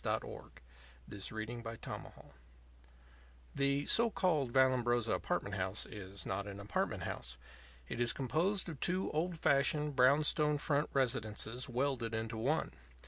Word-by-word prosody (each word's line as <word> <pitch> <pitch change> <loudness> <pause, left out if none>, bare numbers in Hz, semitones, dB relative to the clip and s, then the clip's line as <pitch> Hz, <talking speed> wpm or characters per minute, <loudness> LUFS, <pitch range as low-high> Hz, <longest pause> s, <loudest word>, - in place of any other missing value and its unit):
Roosevelt - - -3 0.6
THE 100 - -8
THIRD 110 +3 -4
INGREDIENT 115 -1 -6 1.5
The 140 +1 +1
(so 235 0 +5
called) 155 - +1
Vallambrosa 120 -3 +3
Apartment - - -1
House - - -1
is 100 -1 -7
not 100 +1 -2
an 100 0 -7
apartment 100 +1 -2
house. 60 0 -3 0.5
It - - -5
is 120 -1 +3
composed 170 +10 0
of 155 -5 -6
two 185 +2 0
old 165 +3 -1
fashioned, 150 0 +2
brownstone 150 +3 +4
front 145 0 0
residences 120 -1 -1
welded 125 -3 -1
into 110 0 -3
one. 140 +8 0
130 Hz, 130 wpm, -35 LUFS, 115-150 Hz, 1.5 s, so